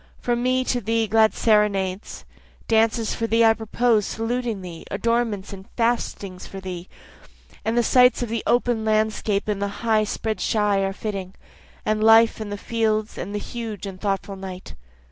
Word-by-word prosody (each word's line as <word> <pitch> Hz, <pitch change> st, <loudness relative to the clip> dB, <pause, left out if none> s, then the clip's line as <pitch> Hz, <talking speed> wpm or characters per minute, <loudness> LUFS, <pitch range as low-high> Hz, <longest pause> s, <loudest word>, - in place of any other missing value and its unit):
From 240 Hz, -1 st, -1 dB
me 255 Hz, +1 st, +2 dB
to 250 Hz, -1 st, -1 dB
thee 225 Hz, +1 st, +1 dB
glad 220 Hz, +1 st, +3 dB
serenades, 205 Hz, -3 st, +1 dB, 0.4 s
Dances 225 Hz, 0 st, +2 dB
for 230 Hz, -, -2 dB
thee 230 Hz, +1 st, +4 dB
I 225 Hz, -, +6 dB
propose 225 Hz, -1 st, +1 dB
saluting 230 Hz, -3 st, -2 dB
thee, 170 Hz, -2 st, -8 dB
adornments 220 Hz, -1 st, -1 dB
and 190 Hz, 0 st, -11 dB
feastings 230 Hz, -5 st, -1 dB
for 195 Hz, -, -8 dB
thee, 185 Hz, -1 st, -7 dB, 0.7 s
And 225 Hz, +2 st, -1 dB
the 240 Hz, -, +4 dB
sights 250 Hz, +1 st, +4 dB
of 240 Hz, -, -4 dB
the 230 Hz, -1 st, -2 dB
open 240 Hz, -2 st, +2 dB
landscape 215 Hz, -1 st, 0 dB
and 205 Hz, -2 st, -2 dB
the 200 Hz, +3 st, -4 dB
high 215 Hz, -1 st, +3 dB
spread 220 Hz, +1 st, -3 dB
shy 210 Hz, -2 st, +1 dB
are 195 Hz, 0 st, 0 dB
fitting, 195 Hz, -2 st, -5 dB, 0.5 s
And 215 Hz, 0 st, +1 dB
life 225 Hz, 0 st, +6 dB
and 210 Hz, -1 st, -5 dB
the 205 Hz, -, -3 dB
fields, 215 Hz, 0 st, -1 dB
and 205 Hz, -, -5 dB
the -, -, -1 dB
huge 220 Hz, -4 st, -6 dB
and 190 Hz, -2 st, -8 dB
thoughtful 195 Hz, -1 st, -2 dB
night. 190 Hz, -1 st, -8 dB
215 Hz, 170 wpm, -23 LUFS, 200-230 Hz, 0.7 s, I